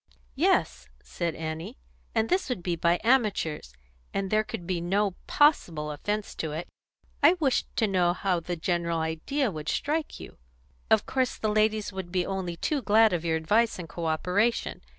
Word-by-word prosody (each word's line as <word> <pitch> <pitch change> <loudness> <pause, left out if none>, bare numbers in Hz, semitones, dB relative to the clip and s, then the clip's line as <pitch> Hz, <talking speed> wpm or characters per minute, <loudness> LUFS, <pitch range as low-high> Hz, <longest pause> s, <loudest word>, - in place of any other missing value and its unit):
"Yes," 60 +1 +1 0.2
said 170 -2 -3
Annie, 160 - -5 0.4
"and 220 - +2
this 365 0 0
would 215 -9 -3
be 175 -1 0
by 170 +1 +2
amateurs, 210 - +1 0.4
and 195 -1 -1
there 215 0 +3
could 175 - -7
be 175 -1 -2
no 195 +4 +1 0.2
possible 170 - +2
'offence 205 +8 -3
in 155 - -3
it.' 165 +3 -4 0.5
I 295 +4 +7
wished 300 -8 0
to 225 - +2
know 180 -4 +2
how 185 -1 0
the 175 +1 -4
general 170 0 -1
idea 180 - -1
would 155 -2 -5
strike 305 +2 -2
you. - - -11 0.5
Of - - +4
course 260 -1 -1
the 215 - -1
ladies 215 -1 +1
would 190 -2 -6
be 180 -1 0
only 190 -3 -3
too 290 - -1
glad 220 -2 +5
of 170 -2 -1
your 165 -1 +1
advice 210 +9 +2
and 175 -3 -7
co 165 0 -4
operation. 180 +9 0
185 Hz, 175 wpm, -27 LUFS, 165-220 Hz, 0.5 s, I